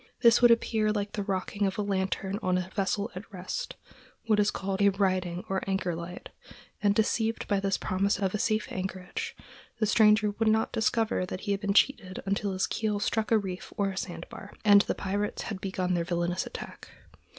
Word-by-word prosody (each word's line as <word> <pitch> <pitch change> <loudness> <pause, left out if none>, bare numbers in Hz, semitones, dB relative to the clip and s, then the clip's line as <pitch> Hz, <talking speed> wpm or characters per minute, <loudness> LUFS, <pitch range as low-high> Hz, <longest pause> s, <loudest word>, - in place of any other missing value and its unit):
This 235 -1 +6
would 240 - +8
appear 220 -2 +3
like 205 -1 -2
the 210 - -3
rocking 195 +1 -1
of 190 - -3
a 210 - 0
lantern 195 0 -1
on 185 0 +1
a 185 +1 -4
vessel 200 +2 -1
at 200 +5 -8
rest—what 215 - -4
is 205 0 +4
called 195 0 -2
a 200 - +6
riding 185 -3 0
or 190 0 -1
anchor 190 -2 0
light; 170 +2 -7 0.5
and, 205 -1 +3
deceived 225 +1 0
by 200 -1 +2
this 195 -1 0
promise 195 +2 0
of 195 -2 -1
a 210 - -1
safe 215 0 +1
anchorage, 190 - -4 0.4
the 220 - +1
stranger 210 0 +4
would 225 +2 -1
not 220 0 +2
discover 225 -2 +1
that 185 - -5
he 205 - -2
had 200 0 0
been 200 -1 0
cheated 215 -8 +2
until 200 +1 0
his 185 - +1
keel 215 -2 -1
struck 220 +1 0
a 225 - +5
reef 190 -3 -5
or 195 -2 0
sandbar, 185 +2 -7
and 205 -1 +8
the - - -2
pirates 205 +1 -2
had 195 -3 -5
begun 185 -2 -1
their 170 -1 +1
villainous 175 +1 -1
attack. - - -9
200 Hz, 195 wpm, -28 LUFS, 190-215 Hz, 0.5 s, would